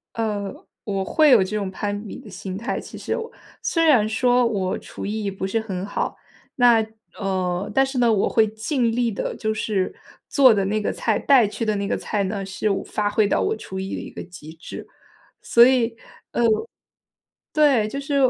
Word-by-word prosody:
呃， 210 Hz, -3 st, -2 dB, 0.3 s
我 195 Hz, -2 st, -2 dB
会 305 Hz, -, +4 dB
有 230 Hz, -6 st, +7 dB
这 195 Hz, +3 st, -4 dB
种 200 Hz, -2 st, -2 dB
攀 205 Hz, +2 st, -4 dB
比 -, -, -8 dB
的 250 Hz, -5 st, -12 dB
心 190 Hz, 0 st, -6 dB
态 235 Hz, +5 st, -3 dB
其 -, -, -10 dB
实 -, -, -3 dB
哦。 460 Hz, 0 st, -4 dB, 0.3 s
虽 330 Hz, -, +1 dB
然 250 Hz, -9 st, +5 dB
说 245 Hz, +2 st, +3 dB
我 195 Hz, -5 st, -1 dB
厨 -, -, -8 dB
艺 210 Hz, 0 st, -2 dB
不 190 Hz, 0 st, -4 dB
是 195 Hz, +4 st, 0 dB
很 195 Hz, -4 st, -4 dB
好， 205 Hz, -, -3 dB, 0.4 s
那 240 Hz, -3 st, +5 dB, 0.3 s
呃， 185 Hz, -2 st, -1 dB
但 270 Hz, 0 st, +4 dB
是 265 Hz, 0 st, -5 dB
呢， 240 Hz, -2 st, +4 dB
我 205 Hz, -3 st, +2 dB
会 220 Hz, -1 st, +3 dB
尽 230 Hz, +3 st, -1 dB
力 235 Hz, 0 st, 0 dB
地 195 Hz, -, -3 dB
就 220 Hz, 0 st, -1 dB
是 210 Hz, -3 st, -1 dB, 0.3 s
做 265 Hz, -5 st, +6 dB
的 200 Hz, -2 st, +1 dB
那 215 Hz, +2 st, 0 dB
个 -, -, -1 dB
菜、 -, -, 0 dB
带 260 Hz, -6 st, +5 dB
去 225 Hz, +3 st, -4 dB
的 215 Hz, -1 st, +1 dB
那 200 Hz, 0 st, -2 dB
个 -, -, 0 dB
菜 205 Hz, -2 st, -2 dB
呢， 195 Hz, 0 st, -3 dB
是 195 Hz, +2 st, -2 dB
我 195 Hz, -, -1 dB
发 210 Hz, -1 st, -1 dB
挥 210 Hz, 0 st, +2 dB
到 -, -, +1 dB
我 425 Hz, +2 st, 0 dB
厨 190 Hz, -, -7 dB
艺 190 Hz, 0 st, -4 dB
的 -, -, -5 dB
一 -, -, -9 dB
个 -, -, -7 dB
极 170 Hz, -3 st, -11 dB
致。 165 Hz, -, -9 dB, 0.5 s
所 235 Hz, 0 st, +6 dB
以 245 Hz, -3 st, +2 dB, 0.4 s
呃， -, -, -1 dB, 1.1 s
对， 285 Hz, -8 st, +4 dB
就 275 Hz, +6 st, -4 dB
是 285 Hz, +1 st, -3 dB
215 Hz, 220 characters per minute, -23 LUFS, 195-240 Hz, 1.1 s, 有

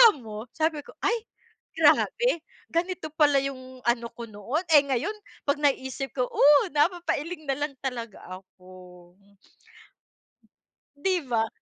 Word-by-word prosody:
alam 260 Hz, -, -13 dB
mo 215 Hz, +2 st, -7 dB
sabi 315 Hz, -1 st, +1 dB
ko -, -, -12 dB
"Ay, 465 Hz, -1 st, 0 dB, 0.5 s
grabe. 485 Hz, -7 st, +3 dB, 0.3 s
Ganito 340 Hz, -2 st, -2 dB
pala 300 Hz, -2 st, +3 dB
yung 260 Hz, -2 st, -7 dB
ano 235 Hz, 0 st, +1 dB
ko 235 Hz, -, -7 dB
noon" 240 Hz, -, -2 dB
Eh, 300 Hz, -, +9 dB
ngayon 275 Hz, -, -1 dB, 0.3 s
pag 285 Hz, 0 st, 0 dB
naiisip 270 Hz, -2 st, -1 dB
ko 255 Hz, -, +1 dB
oh, 290 Hz, 0 st, +5 dB
napapailing 330 Hz, +1 st, 0 dB
nalang 280 Hz, +1 st, -2 dB
talaga 235 Hz, -5 st, -5 dB, 0.2 s
ako. 180 Hz, -2 st, -16 dB, 1.8 s
Di 365 Hz, +5 st, 0 dB
ba? 225 Hz, -2 st, +1 dB
275 Hz, 125 wpm, -26 LUFS, 235-315 Hz, 1.8 s, Eh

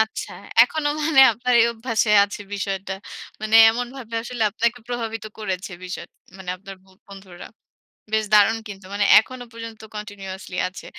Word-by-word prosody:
আচ্ছা। 220 Hz, 0 st, -2 dB, 0.3 s
এখনো 290 Hz, +4 st, 0 dB
মানে 300 Hz, -3 st, +4 dB
আপনার 245 Hz, +3 st, -1 dB
এই 230 Hz, -, +5 dB
অভ্যাসে 230 Hz, -1 st, -1 dB
আছে 205 Hz, +1 st, -8 dB
বিষয়টা। 195 Hz, -1 st, -3 dB, 0.5 s
মানে 215 Hz, 0 st, -2 dB, 0.2 s
এমনভাবে 245 Hz, 0 st, -6 dB
আসলে 240 Hz, -1 st, -4 dB
আপনাকে 235 Hz, +2 st, -1 dB
প্রভাবিত 225 Hz, -2 st, -4 dB
করেছে 190 Hz, -2 st, -4 dB
বিষয়টা 180 Hz, +1 st, -8 dB, 0.2 s
মানে 190 Hz, -2 st, -6 dB
আপনার 195 Hz, +1 st, -11 dB
বন্ধুরা। 190 Hz, -1 st, -13 dB, 0.7 s
বেশ 220 Hz, 0 st, +2 dB
দারুণ 210 Hz, +2 st, +5 dB
কিন্তু। 195 Hz, -2 st, -10 dB
মানে 205 Hz, 0 st, +1 dB
এখনো 255 Hz, +3 st, -7 dB
পর্যন্ত 230 Hz, -1 st, -9 dB
কন্টিনিউয়াসলি 195 Hz, -3 st, -8 dB
আছে। 185 Hz, -, -11 dB
215 Hz, 140 wpm, -22 LUFS, 195-235 Hz, 0.7 s, এই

